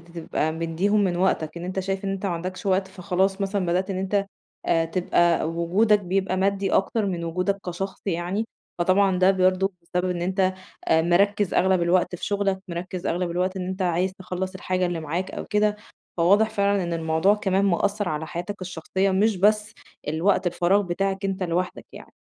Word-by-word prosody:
تبقى 160 -1 -1
مدّيهم 165 +6 +1
من 175 -2 0
وقتك 175 -3 0
إن 170 - -7
أنت 185 +1 -3
شايف 195 +1 -3
إن - - -1
أنت 195 +1 -4
ما 190 - 0
عندكش 185 +4 -5
وقت 190 0 +2
فخلاص 190 +1 -1
مثلًا 195 -1 -1
بدأت 185 +3 0
إن 190 - -2
أنت، 195 +1 0 0.4
آآ، 165 -1 +2
تبقى 175 0 +2
وجودك 190 +6 +2
بيبقى 190 0 -1
مادي 195 0 +1
أكتر 210 +2 +1
من 175 -3 -2
وجودك 180 +4 -1
كشخص 190 +2 -5
يعني، 185 +4 -1 0.3
فطبعًا 185 +1 +3
ده 185 +1 +6
برضه 185 +1 +2
بسبب 180 +2 -2
إن 175 -1 -2
أنت 185 +1 +1 0.4
مركِّز 185 +5 +3
أغلب 190 -1 +3
الوقت 180 +1 +2
في - - -6
شغلك، 200 -2 0
مركِّز 175 +1 -5
أغلب 175 0 -1
الوقت 185 +2 -1
إن 180 -1 -4
أنت 190 +1 -4
عايز 180 +1 +1
تخلَّص 185 0 -5
الحاجة 185 0 -1
اللي 175 -2 -2
معاك 165 +5 -3
أو - - -6
كده، 210 0 +1 0.4
فواضح 200 +6 +4
فعلًا 200 -3 +1
إن 170 -1 -2
الموضوع 165 +4 +2
كمان 195 -1 +1
مأثّر 200 +2 +1
على 155 +1 -3
حياتك 180 +4 -5
الشخصية، 185 +2 -1
مش 205 +1 +2
بس 210 +2 +2 0.3
الوقت 175 +5 +1
الفراغ 175 +3 +2
بتاعك 195 +2 -2
أنت 195 -1 -2
لوحدك 180 +1 -2
يعني. - - -12
185 Hz, 180 wpm, -24 LUFS, 175-195 Hz, 0.4 s, ده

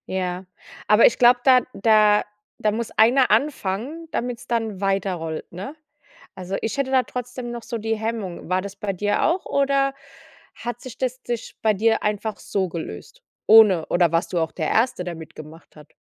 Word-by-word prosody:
Ja, 185 0 -3 0.4
aber 210 +2 +6
ich 240 - +4
glaube, 245 0 +6
da 255 -2 +6
da 210 0 +4 0.4
da 215 - +1
muss 225 +2 -4
einer 250 +4 +4
anfangen, 280 - -1
damit's 245 -1 -4
dann 225 -4 -2
weiterrollt, 185 -5 -2
ne? 195 - -7 0.6
Also, 185 +1 -5
ich 225 +5 -3
hätte 275 -1 -1
da 260 -1 +4
trotzdem 250 0 -6
noch 240 -1 -6
so 235 - -5
die 225 +1 -2
Hemmung. 220 -6 -5
War 185 +1 0
das 200 0 -8
bei 200 0 -3
dir 205 +2 0
auch 350 +3 +1
oder 275 -1 +1 0.6
hat 240 0 -6
sich 255 -3 -10
das 255 0 -2
sich 240 -2 -5
bei 215 -1 +3
dir 225 +3 +1
einfach 210 +1 -2
so 190 -2 -2
gelöst, 170 - -8 0.2
ohne 210 -7 +7
oder 175 -2 +2
warst 165 0 0
du 175 - 0
auch 160 -1 -1
der 155 -3 -3
1e, 225 -5 +1
der 175 -1 -5
mit 160 -2 -11
gemacht 155 +2 -13
hat? 150 0 -16
215 Hz, 185 wpm, -22 LUFS, 185-245 Hz, 0.6 s, ohne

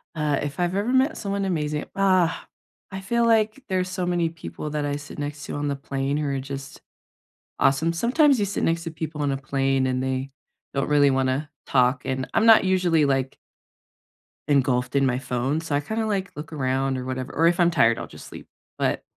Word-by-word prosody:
Uh, 150 -2 0
if 145 +4 -5
I've 175 +1 0
ever 210 +5 0
met 265 +4 +2
someone 200 -1 -2
amazing 150 -4 -1
ah, 185 -3 +2 0.5
I 190 - -5
feel 235 +4 +1
like 225 +3 +2
there's 185 -1 0
so 180 -1 -2
many 175 -2 +1
people 160 -2 -7
that 150 -1 -2
I 145 0 -1
sit 145 +1 -9
next 145 0 -5
to - - -5
on 145 0 -2
the 140 - -1
plane 140 +1 -2
who 150 -1 -1
are 135 -1 -1
just 135 0 -7 0.8
awesome. 155 +5 +2
Sometimes 260 - +3
you 205 - +1
sit 200 - -3
next 165 +1 0
to 165 - -4
people 155 -1 -5
on 140 -1 +1
a - - -1
plane, 135 -1 0
and 130 0 -1
they 130 +1 -2 0.4
don't 140 +1 0
really 145 -1 +4
wanna 135 +3 0 0.2
talk. 125 0 +2
And 130 -1 -2
I'm 225 0 +3
not 225 -3 +7
usually, 180 -5 +3
like 135 -1 0 1.1
engulfed 130 -2 +1
in 135 -1 +4
my 125 0 +1
phone, 135 +5 -1
so 160 -3 -2
I 145 - +2
kinda, 220 +8 -2
like, 195 -2 -2
look 150 +2 -8
around 135 -2 -1
or 125 - -5
whatever. 130 +1 -4
Or 165 - +3
if 170 +1 +2
I'm 175 0 +5
tired, 115 -8 +3
I'll - - -6
just - - -12
sleep. - - -11 0.3
But, - - 0
150 Hz, 210 wpm, -24 LUFS, 135-185 Hz, 1.1 s, not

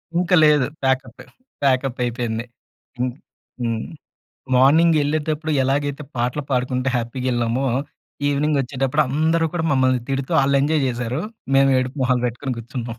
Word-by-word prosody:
ఇంక 180 +2 0
లేదు. 150 -3 +4 0.2
ప్యాకప్పె. 130 -2 -1 0.4
ప్యాకప్ 130 -2 +1
అయిపోయింది. 120 -1 -2 0.5
ఇంక్ 125 -1 -1 0.5
హ్మ్. 115 -2 -2 0.7
మార్నింగెళ్ళేటప్పుడు 155 +2 +3
ఎలాగైతే 140 +2 -1
పాటలు 125 +5 -1
పాడుకుంటే 125 0 0
హ్యాపీగెళ్ళామో 120 +1 -1 0.6
ఈవెనింగ్ 145 +1 +1
ఒచ్చేటప్పుడు 135 0 0
అందరూ 160 +4 +1
కూడా 175 -2 -2
మమ్మల్ని 130 -1 +2
తిడుతూ 135 0 -2
ఆళ్ళెంజాయ్ 140 +2 +2
జేసారు. 125 +3 -2 0.4
మేము 135 0 +5
ఏడుపు 130 +3 -3
మొహాలు 125 -1 +1
బెట్టుకొని 125 +2 -3
గూర్చున్నాం. 120 0 -6
130 Hz, 115 wpm, -21 LUFS, 125-145 Hz, 0.7 s, మేము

